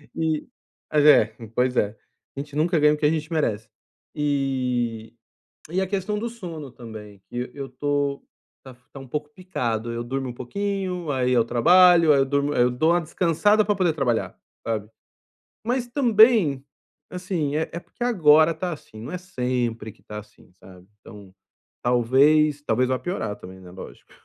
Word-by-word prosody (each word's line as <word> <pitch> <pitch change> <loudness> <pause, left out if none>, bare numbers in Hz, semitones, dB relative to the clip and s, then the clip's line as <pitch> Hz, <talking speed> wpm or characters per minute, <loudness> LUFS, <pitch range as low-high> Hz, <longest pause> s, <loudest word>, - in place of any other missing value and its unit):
e 160 -2 -1 0.4
mas 150 -1 +3
é, 115 -7 +6 0.2
pois 125 0 +1
é, 100 - +2 0.5
a - - -3
gente 145 0 -7
nunca 160 +2 +2
ganha 150 0 +5
o - - -2
que 150 - -1
a - - +5
gente 155 0 -3
merece, 110 -10 -1 0.5
e 125 -6 -1 0.6
e 180 +3 0
a 190 - -1
questão 200 +2 -2
do 235 +2 -3
sono 170 - -8
também, 105 -4 -11
que 125 +1 -5
eu 140 -1 -7
tô 140 +1 -2 0.4
tá 130 - -11 0.2
tá 140 - -9
um 135 - -11
pouco 150 +3 -4
picado, 120 - -3
eu 115 0 -4
durmo 130 +2 -3
um - - -6
pouquinho, 185 +4 -3
aí 130 -2 0
eu 120 -3 +3
trabalho, 170 +7 +6
aí 140 - +3
eu 135 - +3
durmo 140 +1 0
aí - - +2
eu 125 - +4
dou 155 +7 +2
uma 175 0 +2
descansada 180 +6 +2
pra 205 - +1
poder 180 -4 +1
trabalhar, 130 -7 -1 0.3
sabe. 110 -2 -3 0.8
Mas 245 +1 -1
também, 220 - +4 0.4
assim, 180 -6 -3
é 160 +1 -1
é 170 - -4
porque 240 - -8
agora 160 -8 +5
tá 180 +3 -4
assim, 110 -7 -12
não 115 - -7
é 180 - -3
sempre 125 -9 -3
que - - -26
tá 105 0 -7
assim, 105 -3 -18
sabe, 90 -1 -16
então, 100 -2 -14 0.5
talvez, 140 +5 +3
talvez 125 0 +1
vá 130 -1 0
piorar 110 - -3
também, 95 0 -12
né, 90 -1 -13
lógico, 95 - -12
145 Hz, 180 wpm, -24 LUFS, 120-170 Hz, 0.8 s, é